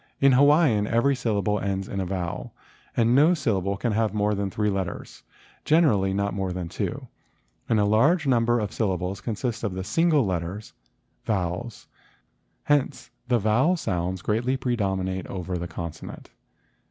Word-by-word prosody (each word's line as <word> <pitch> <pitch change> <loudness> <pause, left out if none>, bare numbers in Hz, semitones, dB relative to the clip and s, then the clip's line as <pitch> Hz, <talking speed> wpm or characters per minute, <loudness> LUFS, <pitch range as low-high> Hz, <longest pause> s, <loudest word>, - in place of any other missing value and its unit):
In 140 0 +5
Hawaiian 140 -5 +4
every 120 +5 +2
syllable 105 -4 0
ends 95 0 -2
in 100 - -4
a 95 - -2
vowel 90 -2 -4 0.4
and 115 0 +3
no 155 +7 +5
syllable 100 - -1
can 120 +3 -1
have 110 -1 0
more 105 0 +1
than 100 -1 -2
three 105 +1 0
letters, 95 -3 -5 0.4
generally 115 - +3
not 100 +1 -1
more 95 -2 -2
than 90 -2 -4
two - - -4 0.6
and 110 - +3
a 105 - +3
large 145 - +3
number 120 -2 +2
of 105 -3 -3
syllables 95 -3 -2
consist 115 +1 -3
of 95 -4 -3
single 155 - +2
letters— 95 +3 -4 0.5
vowels. 100 +3 -3 0.8
Hence 145 -2 0 0.2
the 125 -1 +3
vowel 120 - +2
sounds 90 - -2
greatly 120 +5 0
predominate 95 -7 -2
over 90 -1 -4
the 90 0 -3
consonant. 85 -2 -8
105 Hz, 150 wpm, -25 LUFS, 95-120 Hz, 0.8 s, In